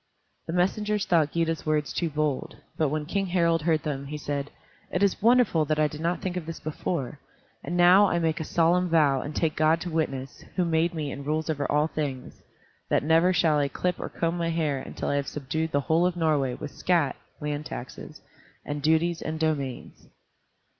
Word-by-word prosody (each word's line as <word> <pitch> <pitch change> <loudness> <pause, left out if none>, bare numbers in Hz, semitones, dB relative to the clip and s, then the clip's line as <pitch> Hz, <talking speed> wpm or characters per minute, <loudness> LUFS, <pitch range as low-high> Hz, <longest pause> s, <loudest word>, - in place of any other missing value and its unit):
The 165 - -3
messengers 210 +3 +1
thought 160 -4 +2
Gyda's 165 -1 -1
words 150 -1 0
too 170 - -1
bold, 150 -2 -2 0.2
but 155 -3 +1
when 150 +1 -2
King 195 +4 -1
Harald 170 -2 +2
heard 160 -1 +1
them, 140 -2 -3
he 150 +2 -5
said, 145 -1 -3 0.4
"It 180 - 0
is 200 - +1
wonderful 230 -8 +4
that 155 +1 0
I 155 0 +3
did 150 +1 -8
not 170 +2 -1
think 185 -1 -2
of 175 -3 -4
this 165 - -6
before. 150 -3 -4 0.4
And 175 - -3
now 180 +3 +7
I 175 - +1
make 165 -1 0
a - - -2
solemn 175 +3 +2
vow 145 -5 +3
and 150 +1 -6
take 160 -2 0
God 155 +1 +3
to 175 - -4
witness, 135 -4 -3
who 180 - +2
made 165 +1 +1
me 150 -3 -3
and 140 - -6
rules 155 +2 -1
over 145 -2 -2
all 150 +1 +3
things, 145 -5 -5 0.5
that - - +2
never 165 +4 +4
shall 160 -4 +3
I 140 - +2
clip 180 +5 -2
or - - -4
comb 165 +1 -1
my 170 -1 -1
hair 155 -4 0
until - - -6
I 145 - +1
have 140 - -2
subdued 155 +3 -3
the 140 - +1
whole 160 +6 +2
of 180 - -2
Norway 145 -6 +1
with 145 - -7
scat 165 -7 +1 0.2
[land 150 0 -3
taxes], 125 - -8 0.4
and 145 0 -4
duties, 160 +2 +2
and 155 +1 -4
domains." 145 -5 -3
160 Hz, 205 wpm, -26 LUFS, 150-170 Hz, 0.5 s, now